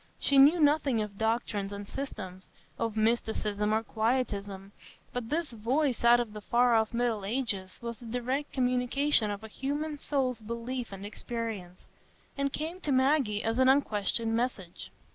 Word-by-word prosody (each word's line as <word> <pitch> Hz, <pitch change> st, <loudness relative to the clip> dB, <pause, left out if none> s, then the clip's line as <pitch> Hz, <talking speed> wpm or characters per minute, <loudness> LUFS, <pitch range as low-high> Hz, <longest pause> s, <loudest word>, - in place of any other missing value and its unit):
She 280 Hz, -1 st, +4 dB
knew 295 Hz, +6 st, +7 dB
nothing 290 Hz, -5 st, +3 dB
of 200 Hz, -1 st, -9 dB
doctrines 220 Hz, -3 st, -1 dB
and 200 Hz, 0 st, -6 dB
systems, 190 Hz, -10 st, -7 dB, 0.3 s
of 225 Hz, -1 st, -2 dB
mysticism 215 Hz, -2 st, 0 dB
or 220 Hz, +1 st, +1 dB
quietism; 205 Hz, -4 st, -2 dB, 0.4 s
but 245 Hz, -2 st, -4 dB
this 325 Hz, -1 st, -1 dB
voice 245 Hz, +4 st, 0 dB
out 240 Hz, 0 st, +7 dB
of 230 Hz, -3 st, -3 dB
the 210 Hz, -, -7 dB
far 240 Hz, +3 st, +3 dB
off 220 Hz, -1 st, +3 dB
middle 235 Hz, -3 st, 0 dB
ages 200 Hz, -4 st, -2 dB
was 235 Hz, -1 st, -5 dB
the 240 Hz, -, -10 dB
direct 250 Hz, +5 st, -2 dB
communication 250 Hz, -1 st, +2 dB
of 205 Hz, +1 st, -5 dB
a -, -, -6 dB
human 290 Hz, +6 st, -3 dB
soul's 260 Hz, -5 st, -1 dB
belief 235 Hz, +2 st, -4 dB
and 195 Hz, 0 st, -7 dB
experience, 210 Hz, -4 st, -6 dB, 0.5 s
and 280 Hz, 0 st, -1 dB
came 325 Hz, +6 st, -4 dB
to 295 Hz, -, -2 dB
Maggie 260 Hz, -5 st, +2 dB
as 225 Hz, +2 st, 0 dB
an 260 Hz, 0 st, +6 dB
unquestioned 225 Hz, -4 st, +2 dB
message. 225 Hz, -7 st, -3 dB
235 Hz, 160 wpm, -30 LUFS, 210-265 Hz, 0.5 s, knew